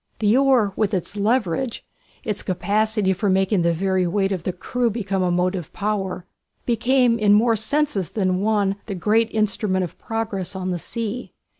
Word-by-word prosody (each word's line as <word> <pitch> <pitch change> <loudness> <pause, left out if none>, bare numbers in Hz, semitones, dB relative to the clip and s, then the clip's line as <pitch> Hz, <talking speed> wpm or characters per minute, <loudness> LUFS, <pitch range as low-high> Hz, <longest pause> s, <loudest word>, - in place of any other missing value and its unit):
The 215 +1 +2
oar, 260 -7 +3
with 210 -2 0
its 180 +2 -3
leverage, 220 +2 0 0.4
its 215 -5 -1
capacity 205 +2 0
for 200 +2 -1
making 190 0 +2
the 170 0 +2
very 185 +1 0
weight 195 +2 0
of 180 -4 -3
the - - 0
crew 235 +7 -1
become 200 -4 -2
a 180 - +1
motive 180 -1 -1
power, 195 -3 -2 0.4
became 240 0 +2
in 205 -1 +4
more 225 +2 +4
senses 220 - 0
than 185 -3 0
one 205 -2 +1
the 200 - -4
great 220 +5 +2
instrument 205 -3 +1
of 175 - -7
progress 215 -5 -3
on 185 -1 -3
the 175 - -2
sea. 230 +5 -4
205 Hz, 170 wpm, -22 LUFS, 185-225 Hz, 0.4 s, in